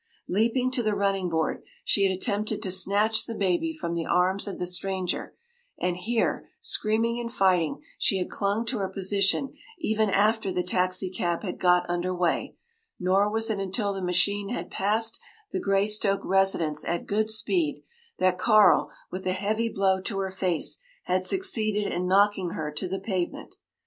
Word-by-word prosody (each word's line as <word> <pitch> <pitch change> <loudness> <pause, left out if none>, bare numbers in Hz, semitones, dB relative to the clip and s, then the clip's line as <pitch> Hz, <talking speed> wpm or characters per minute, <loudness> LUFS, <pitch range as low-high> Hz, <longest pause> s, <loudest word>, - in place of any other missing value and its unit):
Leaping 235 +6 +1
to 255 - 0
the 215 -2 0
running 195 -2 0
board, 160 -1 -1 0.2
she 200 - +2
had 195 -1 +4
attempted 210 +2 -1
to 190 - -1
snatch 205 +4 +2
the 230 - -4
baby 195 - +1
from 310 - -4
the 170 -1 -1
arms 185 +3 +2
of 200 - -5
the 180 - -2
stranger, 185 0 -3 0.4
and 180 -1 0
here, 225 +6 -1
screaming 230 - +1
and 235 -1 -4
fighting, 185 -7 +2 0.2
she 195 - +2
had 180 - -2
clung 205 +3 -1
to 235 -1 -2
her 190 -1 -1
position 195 +7 +1 0.2
even 220 - +1
after 210 +1 +2
the 180 0 -1
taxicab 180 -1 0
had 185 - -5
got 180 -1 +3
under 175 +1 -1
way; 175 -2 0 0.4
nor 190 +3 +3
was 225 +1 0
it 205 - -2
until 195 +1 -1
the 195 - -5
machine 195 +3 +1
had 245 - -4
passed 220 +3 0 0.3
the 375 - -1
Greystoke 200 - +2
residence 190 -6 +2
at 170 0 -2
good 215 +1 0
speed 300 - 0 0.3
that 185 0 +2
Carl, 215 -2 +5 0.2
with 185 +1 -5
a 185 - +2
heavy 215 +4 -1
blow 190 -2 +1
to 195 +1 -3
her 190 -1 -2
face, 185 -3 -1 0.2
had 185 +1 0
succeeded 215 - 0
in 180 +1 -1
knocking 195 -1 +3
her 150 -1 -3
to 150 +5 -3
the 190 +2 -3
pavement. 185 -3 -3
195 Hz, 170 wpm, -26 LUFS, 185-215 Hz, 0.4 s, Carl